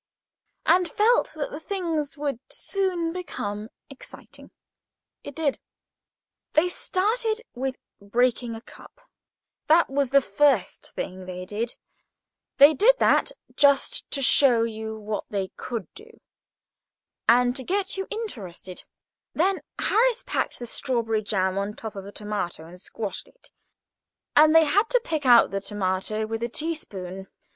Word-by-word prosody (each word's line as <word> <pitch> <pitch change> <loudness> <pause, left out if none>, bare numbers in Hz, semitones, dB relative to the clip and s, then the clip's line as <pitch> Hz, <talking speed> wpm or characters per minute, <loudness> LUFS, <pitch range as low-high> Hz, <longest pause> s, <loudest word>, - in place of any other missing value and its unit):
and 360 0 +4
felt 455 +7 +3
that 300 -2 -4
the 295 - -6
thing 335 -3 -2
would 285 -4 -2
soon 360 -4 -1
become 215 - -5 0.2
exciting. 275 - -13 0.7
It 285 - -8
did. 305 -4 0 0.9
They 335 +4 +4
started 435 +5 0
with 260 +1 -3 0.3
breaking 235 +2 0
a 225 - -8
cup. - - -16 0.7
That 325 -1 +4
was 275 -1 +1
the 275 +2 +6
first 255 -2 +1
thing 185 0 -5
they 180 0 -6
did. 220 +5 -4 0.8
They 285 +3 +8
did 455 - +5
that - - +3 0.2
just 285 - +3
to 275 - -2
show 250 -3 +5
you 220 -1 -4
what 210 0 -4
they 195 -2 -2
could 230 -6 -5
do, 455 +2 -15 1.1
and 245 +1 +5
to 265 - -3
get 390 +5 -1
you 385 0 -4
interested. 200 - -6 0.5
Then 375 +4 +2 0.2
Harris - - +2
packed - - -1
the 240 - -6
strawberry 230 -2 0
jam 190 -2 0
on 200 +1 -3
top 220 -2 -7
of 195 0 -7
a - - -8
tomato 205 -6 -4
and 180 +2 -12
squashed 205 +1 -5
it, - - -17 0.8
and 310 +1 +7
they 325 -1 +8
had 410 +9 +2
to - - +3
pick 305 -4 -2
out 240 -2 +7
the 195 0 -2
tomato 205 +1 -2
with 225 +1 -4
a 235 - -1
teaspoon. 195 - -5
255 Hz, 140 wpm, -25 LUFS, 210-335 Hz, 1.1 s, They